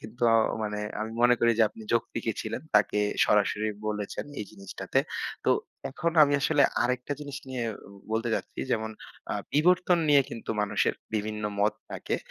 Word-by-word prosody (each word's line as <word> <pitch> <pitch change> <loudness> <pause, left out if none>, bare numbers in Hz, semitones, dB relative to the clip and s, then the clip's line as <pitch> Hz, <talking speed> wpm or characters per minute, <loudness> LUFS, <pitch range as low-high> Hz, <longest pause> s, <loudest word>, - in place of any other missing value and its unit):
কিন্তু 110 +3 -11
অ - - +6 0.3
মানে, 105 -1 -2 0.2
আমি 110 +1 -3
মনে 125 0 +6
করি 120 - +5
যে 115 - +6
আপনি 110 - -13
যৌক্তিকই 115 - -1
ছিলেন। - - -4
তাকে 105 - +4 0.3
সরাসরি 105 +1 +2 0.2
বলেছেন, 105 -1 -3 0.2
এই - - -3
জিনিসটাতে। 100 -3 -3 0.5
তো - - +3 0.4
এখন 170 +5 -1
আমি 145 -1 +4
আসলে 145 0 +3 0.2
আরেকটা 125 +3 -1
জিনিস 145 -2 -6
নিয়ে 125 -2 -3 0.5
বলতে 115 +1 0
চাচ্ছি - - -4
যেমন 110 -1 -1 0.4
আ - - -1 0.2
বিবর্তন 180 +3 +4
নিয়ে 145 -1 +6
কিন্তু 115 - -6
মানুষের 105 - +1 0.2
বিভিন্ন 105 0 -2 0.2
মত 105 +1 +3 0.2
থাকে, - - -2
115 Hz, 160 wpm, -28 LUFS, 105-140 Hz, 0.5 s, অ